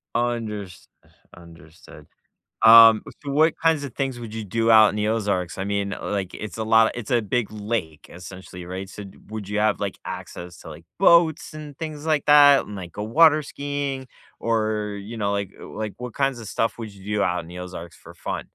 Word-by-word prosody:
Unders 110 Hz, -6 st, -3 dB, 0.5 s
understood. 85 Hz, -1 st, -15 dB, 0.6 s
Um, 115 Hz, -1 st, +9 dB, 0.2 s
so, 145 Hz, -, -7 dB
what 155 Hz, +3 st, +3 dB
kinds 160 Hz, -3 st, +2 dB
of 135 Hz, -4 st, -7 dB
things 135 Hz, -3 st, -3 dB
would 110 Hz, -2 st, -8 dB
you 110 Hz, -1 st, -5 dB
do 115 Hz, +3 st, +1 dB
out 110 Hz, -1 st, +8 dB
in 100 Hz, -, -5 dB
the 105 Hz, 0 st, 0 dB
Ozarks? 100 Hz, -6 st, -1 dB
I 95 Hz, -, -3 dB
mean, 100 Hz, -1 st, -2 dB
like, 100 Hz, -3 st, -3 dB
it's 110 Hz, +1 st, -7 dB
a 110 Hz, -, -2 dB
lot 110 Hz, 0 st, +4 dB
it's 120 Hz, -1 st, -6 dB
a 120 Hz, -2 st, +3 dB
big 110 Hz, +1 st, -2 dB
lake, 105 Hz, -7 st, -4 dB
essentially, 90 Hz, 0 st, -10 dB
right, 95 Hz, +2 st, -6 dB
so, 105 Hz, -, -9 dB
d 95 Hz, -, -13 dB
would 105 Hz, -2 st, -7 dB
you 105 Hz, 0 st, -1 dB
have, 105 Hz, -1 st, +1 dB
like, 100 Hz, -2 st, -4 dB
access 85 Hz, 0 st, -8 dB
to, -, -, -11 dB
like, 80 Hz, +2 st, -12 dB
boats 170 Hz, -4 st, +4 dB
and 150 Hz, -2 st, -9 dB
things 155 Hz, -2 st, -6 dB
like 155 Hz, -3 st, +1 dB
that 145 Hz, -2 st, +7 dB
and, 105 Hz, -, -9 dB
like, 90 Hz, -2 st, -8 dB
go 105 Hz, -, -5 dB
water 155 Hz, +6 st, +5 dB
skiing? 140 Hz, -2 st, -4 dB, 0.3 s
Or, 110 Hz, -2 st, -1 dB
you 115 Hz, +3 st, -8 dB
know, 100 Hz, -1 st, -1 dB
like 100 Hz, -1 st, -3 dB
like, 110 Hz, -1 st, -6 dB
uh, -, -, -38 dB
what 125 Hz, 0 st, -7 dB
kinds 135 Hz, -3 st, 0 dB
of 110 Hz, -, -9 dB
stuff 115 Hz, +3 st, -1 dB
would 110 Hz, -3 st, -7 dB
you 100 Hz, +2 st, -5 dB
do 105 Hz, -, +1 dB
out 90 Hz, 0 st, 0 dB
in 80 Hz, -, -14 dB
the 90 Hz, +1 st, -9 dB
Ozarks 90 Hz, -2 st, -9 dB
for -, -, -14 dB
fun? -, -, -5 dB
110 Hz, 210 wpm, -23 LUFS, 100-125 Hz, 0.6 s, Um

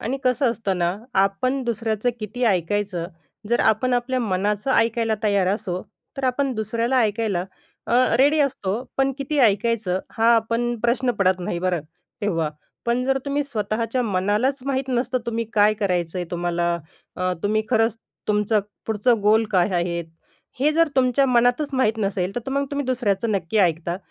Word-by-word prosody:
आणि 255 Hz, +5 st, -2 dB
कसं 255 Hz, 0 st, +2 dB
असतं 205 Hz, -5 st, -2 dB
ना, 175 Hz, +2 st, 0 dB, 0.2 s
आपण 255 Hz, +8 st, +1 dB
दुसऱ्याचं 230 Hz, 0 st, -1 dB
किती 235 Hz, +4 st, -3 dB
ऐकायचं, 190 Hz, -2 st, 0 dB, 0.4 s
जर 240 Hz, -, +2 dB
आपण 235 Hz, +4 st, +2 dB
आपल्या 250 Hz, +1 st, 0 dB
मनाचं 205 Hz, +3 st, -1 dB
ऐकायला 230 Hz, -1 st, +2 dB
तयार 200 Hz, -3 st, +2 dB
असो, 185 Hz, -3 st, -2 dB, 0.3 s
तर 275 Hz, -, -3 dB
आपण 265 Hz, +1 st, +1 dB
दुसऱ्याला 230 Hz, +4 st, 0 dB
ऐकायला 210 Hz, -4 st, 0 dB, 0.4 s
अ, -, -, 0 dB, 0.2 s
रेडी 290 Hz, +4 st, +4 dB
असतो. 255 Hz, -9 st, 0 dB, 0.3 s
पण 270 Hz, 0 st, +2 dB
किती 285 Hz, +2 st, -2 dB
ऐकायचं 215 Hz, -4 st, +2 dB, 0.2 s
हा 230 Hz, +1 st, +5 dB
पण 230 Hz, +1 st, +1 dB, 0.2 s
प्रश्न 245 Hz, +2 st, +1 dB
पडत 185 Hz, -1 st, +2 dB
नाही 175 Hz, -1 st, -3 dB
बरं 180 Hz, -2 st, 0 dB, 0.4 s
तेव्हा. 165 Hz, -6 st, 0 dB, 0.4 s
पण 240 Hz, +1 st, +1 dB
जर 270 Hz, +1 st, +1 dB
तुम्ही 285 Hz, +1 st, 0 dB
स्वतःच्या 230 Hz, 0 st, -2 dB
मनालाच 210 Hz, +6 st, +1 dB
माहीत 265 Hz, -1 st, -1 dB
नसतं 255 Hz, 0 st, 0 dB
तुम्ही 230 Hz, 0 st, -1 dB
काय 210 Hz, 0 st, +5 dB
करायचं 180 Hz, -3 st, 0 dB
आहे 175 Hz, -, -3 dB
तुम्हाला, 175 Hz, 0 st, 0 dB, 0.4 s
अ, 185 Hz, 0 st, 0 dB
तुम्ही 215 Hz, +1 st, +1 dB
खरंच 225 Hz, -1 st, +2 dB, 0.3 s
तुमचं 210 Hz, 0 st, +2 dB, 0.3 s
पुढचं 220 Hz, +1 st, +2 dB
गोल 220 Hz, +2 st, +4 dB
काय 185 Hz, +1 st, +3 dB
आहेत, 170 Hz, -1 st, -1 dB, 0.6 s
हे 300 Hz, +2 st, +3 dB
जर 330 Hz, 0 st, +3 dB
तुमच्या 255 Hz, +1 st, +3 dB
मनातच 245 Hz, +4 st, +2 dB
माहीत 225 Hz, -4 st, +1 dB
नसेल, 195 Hz, -2 st, -1 dB
तिथं 245 Hz, +3 st, -3 dB
मग 280 Hz, 0 st, 0 dB
तुम्ही 285 Hz, -2 st, -2 dB
दुसऱ्याचं 230 Hz, -3 st, 0 dB
नक्की 195 Hz, +2 st, -1 dB
ऐकता 170 Hz, -1 st, +1 dB
220 Hz, 160 wpm, -23 LUFS, 195-250 Hz, 0.6 s, हा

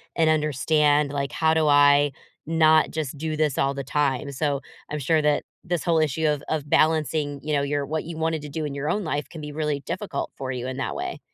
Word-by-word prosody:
and 160 Hz, -1 st, +3 dB
understand, 150 Hz, -1 st, +2 dB
like, 140 Hz, -1 st, -2 dB
"How 160 Hz, -1 st, +2 dB
do 160 Hz, -1 st, +2 dB
I 145 Hz, 0 st, +5 dB, 0.4 s
not 160 Hz, -1 st, +4 dB
just 155 Hz, -3 st, -4 dB
do 155 Hz, +1 st, -3 dB
this 150 Hz, -3 st, 0 dB
all 135 Hz, 0 st, +1 dB
the 140 Hz, -, -4 dB
time?" 140 Hz, 0 st, 0 dB
So, 140 Hz, 0 st, -1 dB, 0.3 s
I'm 150 Hz, -, -3 dB
sure 155 Hz, +3 st, +2 dB
that 150 Hz, -1 st, +2 dB, 0.2 s
this 175 Hz, -1 st, -2 dB
whole 165 Hz, -2 st, +2 dB
issue 155 Hz, +1 st, 0 dB
of 150 Hz, -2 st, 0 dB
of 155 Hz, -2 st, -2 dB
balancing, 155 Hz, -2 st, +2 dB
you 150 Hz, 0 st, -2 dB
know, 145 Hz, -, +2 dB
your 140 Hz, 0 st, -1 dB
what 155 Hz, +2 st, -2 dB
you 165 Hz, 0 st, -7 dB
wanted 160 Hz, -1 st, -1 dB
to 150 Hz, -, -7 dB
do 155 Hz, +2 st, -3 dB
in 145 Hz, -, -4 dB
your 140 Hz, +2 st, -3 dB
own 210 Hz, -, 0 dB
life 150 Hz, -3 st, -3 dB
can 160 Hz, -, -9 dB
be 150 Hz, 0 st, -6 dB
really 150 Hz, -1 st, -2 dB
difficult -, -, -4 dB
for 130 Hz, -1 st, -4 dB
you 125 Hz, -1 st, -4 dB
in 130 Hz, 0 st, -5 dB
that 135 Hz, -, -3 dB
way. 360 Hz, 0 st, -4 dB
150 Hz, 235 wpm, -24 LUFS, 140-160 Hz, 0.4 s, I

